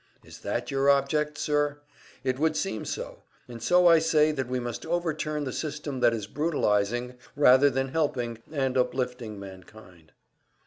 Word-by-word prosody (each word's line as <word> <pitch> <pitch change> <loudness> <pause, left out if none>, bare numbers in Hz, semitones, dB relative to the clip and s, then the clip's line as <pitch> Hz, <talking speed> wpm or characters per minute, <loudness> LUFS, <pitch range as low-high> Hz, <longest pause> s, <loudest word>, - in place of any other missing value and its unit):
Is - - -13
that 120 +2 -3
your 135 0 +2
object, 145 +2 +2
sir? 145 -1 0 0.5
It 130 0 -1
would 160 0 +2
seem 155 - -3
so; - - -6 0.3
and 120 -2 -9
so 180 +7 +4
I 165 -2 +7
say 155 -1 +3
that 135 -4 -3
we 125 0 -2
must 120 -1 -5
overturn 155 -3 -2
the 130 -3 -4
system 145 -3 -4
that 120 - +4
is 110 -3 -3
brutalizing, 120 -3 -1 0.2
rather 140 0 +6
than 135 0 -1
helping 125 -6 -1
and 135 -4 -1
uplifting 125 -4 -2
mankind. 95 -3 -13
135 Hz, 160 wpm, -27 LUFS, 120-150 Hz, 0.5 s, I